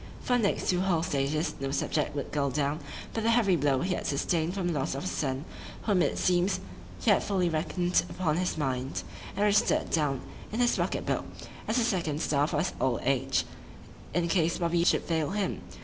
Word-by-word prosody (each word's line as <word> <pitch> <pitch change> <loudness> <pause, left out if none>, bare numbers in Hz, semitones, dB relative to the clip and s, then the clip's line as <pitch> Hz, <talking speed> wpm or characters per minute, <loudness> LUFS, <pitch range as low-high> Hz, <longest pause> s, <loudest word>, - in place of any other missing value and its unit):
For 245 - +1
the 245 - +2
next 200 - 0
two 180 0 +1
whole 175 -4 +1
stages, 150 0 0
no 135 0 -2
subject 145 +2 -1
would 140 - -4
go 140 -2 +1
down, 145 +2 0 0.3
but 225 - -1
the 225 - +3
heavy 225 -5 +4
blow 140 -4 +2
he 180 +1 0
had - - -3
sustain'd 160 +4 0
from 190 -3 -1
the 175 - 0
loss 135 - -1
of 135 - -4
a - - -3
son, 135 -3 -2 0.4
whom 200 -5 +2
it - - +1
seems 180 +1 +2 0.4
he 90 - +3
had - - +4
fully 185 -3 +1
reckon'd 175 +3 +1
upon 170 -4 0
in - - +1
his 180 -2 -1
mind, 130 -2 -2 0.3
and 200 - +1
register'd 205 0 +3
down 145 -5 +1 0.3
in 220 - -3
his 245 -1 +3
pocket - - -1
book, - - -1 0.4
as 220 - +1
a 240 - +3
second 170 -10 0
staff 145 -1 +1
for 150 - -1
his 170 +5 0
old 125 -3 +1
age, 135 0 +1 0.7
in 175 -1 +2
case 170 -1 +2
Bobby 170 -1 +1
should - - +3
fail 160 -3 0
him. 200 0 -2
170 Hz, 210 wpm, -29 LUFS, 145-185 Hz, 0.7 s, heavy